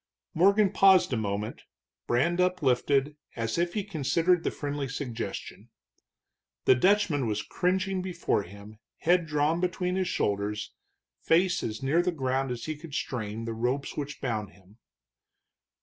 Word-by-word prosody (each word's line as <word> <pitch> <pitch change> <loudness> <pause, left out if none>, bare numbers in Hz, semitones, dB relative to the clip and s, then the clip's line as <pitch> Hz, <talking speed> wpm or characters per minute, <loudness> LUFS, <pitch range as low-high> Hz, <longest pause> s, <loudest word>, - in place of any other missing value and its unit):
Morgan 200 +3 +4
paused 190 -7 +5
a - - +2
moment, 105 -1 -3 0.5
brand 170 +9 +2
uplifted, 145 -4 +1 0.2
as 115 +6 -2
if 175 0 0
he 210 - 0
considered 170 0 +1
the - - +1
friendly 145 -1 -4
suggestion. 130 -3 -6 1.0
The - - +7
Dutchman 170 - +2
was 105 -1 -1
cringing 185 +1 0
before 175 - -1
him, 100 +3 -12 0.2
head 175 0 +3
drawn 150 +2 +1
between 180 0 -1
his 190 -1 0
shoulders, 105 +1 -1 0.5
face 175 +2 +3
as 110 +4 -4
near 150 +6 +3
the 180 +1 0
ground 135 -3 -1
as 120 -2 -4
he 155 - -3
could 150 -1 -9
strain 115 -4 -3
the 115 - -3
ropes 125 +5 -2
which 145 0 -5
bound 110 -6 -3
him. 100 +4 -22
145 Hz, 145 wpm, -28 LUFS, 115-180 Hz, 1.0 s, The